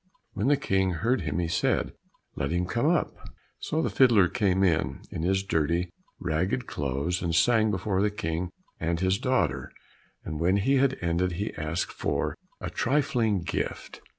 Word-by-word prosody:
When -, -, -1 dB
the 145 Hz, 0 st, +4 dB
King 95 Hz, -9 st, +1 dB
heard 115 Hz, +10 st, +1 dB
him 75 Hz, -1 st, -2 dB
he 85 Hz, -1 st, 0 dB
said, 85 Hz, -, 0 dB, 0.4 s
"Let 70 Hz, -, -2 dB
him 90 Hz, +1 st, 0 dB
come 120 Hz, +9 st, 0 dB
up." 170 Hz, 0 st, +2 dB, 0.5 s
So 160 Hz, +1 st, -1 dB
the -, -, 0 dB
fiddler 115 Hz, -8 st, +5 dB
came 95 Hz, 0 st, +1 dB
in, 85 Hz, -4 st, +1 dB
in -, -, -4 dB
his 95 Hz, +3 st, +1 dB
dirty, 85 Hz, 0 st, 0 dB, 0.3 s
ragged 90 Hz, +8 st, -1 dB
clothes, 70 Hz, +6 st, -2 dB
and 85 Hz, -2 st, -1 dB
sang 110 Hz, +4 st, +4 dB
before 95 Hz, 0 st, 0 dB
the 105 Hz, -, +3 dB
King 85 Hz, -3 st, -3 dB, 0.3 s
and 85 Hz, 0 st, -1 dB
his 95 Hz, +2 st, +1 dB
daughter, 85 Hz, -, 0 dB, 0.5 s
and 80 Hz, -1 st, -4 dB
when 90 Hz, +4 st, +3 dB
he 135 Hz, +8 st, +2 dB
had 135 Hz, 0 st, +2 dB
ended 85 Hz, +1 st, 0 dB
he 100 Hz, +5 st, -3 dB
asked 80 Hz, +3 st, -2 dB
for -, -, -1 dB, 0.2 s
a -, -, -5 dB
trifling 115 Hz, -, +1 dB
gift. -, -, -4 dB
95 Hz, 170 wpm, -27 LUFS, 85-110 Hz, 0.5 s, fiddler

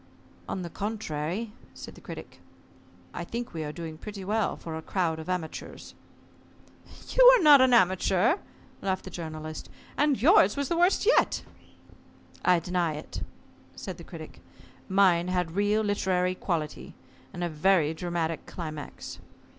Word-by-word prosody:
"On 185 Hz, -, -3 dB
the 170 Hz, -, -5 dB
contrary," 205 Hz, 0 st, -3 dB, 0.2 s
said -, -, -9 dB
the -, -, -15 dB
Critic, -, -, -9 dB, 0.7 s
"I -, -, -4 dB
think 235 Hz, +1 st, -5 dB
we 160 Hz, -1 st, -3 dB
are 150 Hz, -, -4 dB
doing 160 Hz, -1 st, -7 dB
pretty 200 Hz, -1 st, -7 dB
well 215 Hz, +1 st, 0 dB
for 160 Hz, -1 st, -7 dB
a 160 Hz, -, -5 dB
crowd 165 Hz, -2 st, -1 dB
of 160 Hz, -, -8 dB
amateurs." 175 Hz, -4 st, -5 dB, 1.2 s
"You -, -, +5 dB
are 435 Hz, -, -1 dB
not 290 Hz, -3 st, +9 dB
an 260 Hz, -1 st, +5 dB
amateur," 195 Hz, -, +3 dB, 0.4 s
laughed 190 Hz, -1 st, -1 dB
the 185 Hz, -, -9 dB
Journalist, 155 Hz, -2 st, -6 dB, 0.3 s
"and 290 Hz, -2 st, +2 dB
yours 325 Hz, -, +5 dB
was 280 Hz, -1 st, -1 dB
the 340 Hz, -, +1 dB
worst 360 Hz, +3 st, +3 dB
yet." 485 Hz, -, +3 dB, 1.0 s
"I 180 Hz, -1 st, +5 dB
deny 170 Hz, -2 st, -1 dB
it," 150 Hz, -, -7 dB, 0.5 s
said -, -, -7 dB
the -, -, -9 dB
Critic. -, -, -10 dB, 0.5 s
"Mine 185 Hz, -3 st, +4 dB
had 180 Hz, -2 st, -1 dB
real 205 Hz, +4 st, +1 dB
literary 185 Hz, -3 st, +1 dB
quality, 165 Hz, -5 st, -4 dB, 0.4 s
and 175 Hz, -, -5 dB
a -, -, +1 dB
very 160 Hz, -1 st, +2 dB
dramatic 165 Hz, -1 st, -3 dB
climax." 155 Hz, -4 st, -7 dB
180 Hz, 145 wpm, -28 LUFS, 160-210 Hz, 1.2 s, not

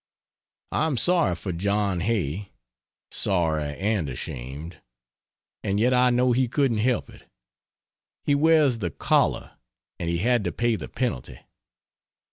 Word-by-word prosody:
I 160 Hz, -, +1 dB
am 145 Hz, -5 st, -1 dB
sorry 170 Hz, -, +3 dB
for 90 Hz, +2 st, -5 dB
John 100 Hz, +1 st, 0 dB
Hay; 95 Hz, -2 st, -1 dB, 0.6 s
sorry 80 Hz, -6 st, 0 dB
and 100 Hz, -6 st, 0 dB
ashamed. 65 Hz, +6 st, -7 dB, 0.8 s
And 100 Hz, 0 st, 0 dB
yet 125 Hz, +3 st, +3 dB
I 125 Hz, 0 st, +4 dB
know 125 Hz, +1 st, +3 dB
he 125 Hz, +1 st, +2 dB
couldn't 125 Hz, -3 st, +1 dB
help 120 Hz, +2 st, +1 dB
it. -, -, -18 dB, 0.9 s
He 145 Hz, -, +2 dB
wears 145 Hz, -4 st, +4 dB
the 90 Hz, -5 st, -2 dB
collar, -, -, 0 dB, 0.4 s
and 85 Hz, -, -2 dB
he 85 Hz, -, 0 dB
had 120 Hz, +4 st, +2 dB
to 90 Hz, -, 0 dB
pay 120 Hz, -1 st, 0 dB
the -, -, -7 dB
penalty. 65 Hz, -, -3 dB
105 Hz, 135 wpm, -25 LUFS, 85-125 Hz, 0.9 s, I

